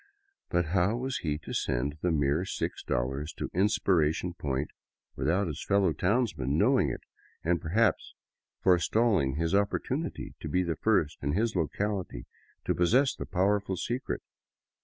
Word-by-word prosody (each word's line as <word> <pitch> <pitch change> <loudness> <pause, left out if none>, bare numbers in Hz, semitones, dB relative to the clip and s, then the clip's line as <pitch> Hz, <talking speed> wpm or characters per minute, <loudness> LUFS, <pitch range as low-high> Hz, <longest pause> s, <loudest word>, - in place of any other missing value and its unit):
But 85 0 +1
how 95 +5 +2
was 130 +1 -2
he 75 -3 -1
to 80 - -8
send 70 +5 -1
the 90 - +1
mere 75 0 +2
$6 70 -4 -3
to - - -4
Inspiration 90 -3 +2
Point 70 -4 -2 0.4
without 80 +9 +1
his 75 -5 -5
fellow 100 -4 +2
townsmen 90 - 0
know - - +4
ing - - +2
it - - -5 0.4
and 85 +1 +1
perhaps 100 +4 +1 0.5
forestalling 95 - +3
his 80 +2 -1
opportunity 125 +10 -1
to - - -6
be 90 0 +2
the 85 -2 -1
first 90 -9 +1
in 70 +1 -1
his 110 +4 0
locality 90 - -2 0.4
to - - +2
possess 125 +10 +3
the - - -7
powerful 100 +1 +1
secret? 120 +8 -3
90 Hz, 145 wpm, -29 LUFS, 75-105 Hz, 0.5 s, know